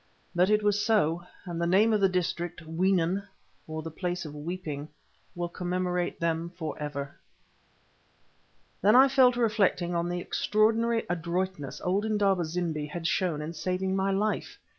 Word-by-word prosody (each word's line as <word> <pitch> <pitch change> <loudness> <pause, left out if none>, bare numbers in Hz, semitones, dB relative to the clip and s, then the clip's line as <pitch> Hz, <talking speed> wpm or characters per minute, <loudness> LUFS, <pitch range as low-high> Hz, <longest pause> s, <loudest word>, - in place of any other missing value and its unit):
But 180 +2 +3
it 210 0 +3
was 205 0 +2
so, 175 -6 +1 0.2
and 170 -2 -4
the 170 - +1
name 210 +5 +4
of 210 - +2
the 195 - +5
district, 175 -1 -2
Weenen, 180 +2 +1 0.5
or 155 0 -5
the 165 - -6
Place 180 +1 -3
of 150 - -7
Weeping, 150 -1 -5 0.5
will 175 0 -2
commemorate 180 0 -2
them 165 0 -1
for 160 -3 -4
ever. 140 -2 -5 1.7
Then 210 +5 +5
I 265 +2 +8
fell 265 -2 +5
to 240 - -4
reflecting 200 -6 +2
on 170 0 0
the 175 0 -2
extraordinary 225 +5 +1
adroitness 175 -3 -2
old 190 +3 +1
Indaba 200 -5 +2
zimbi 160 -2 -2
had 165 +2 -6
shown 160 -1 0
in 160 +2 -5
saving 185 +3 -1
my 195 0 +1
life. 205 +2 -1
180 Hz, 160 wpm, -28 LUFS, 165-200 Hz, 1.7 s, I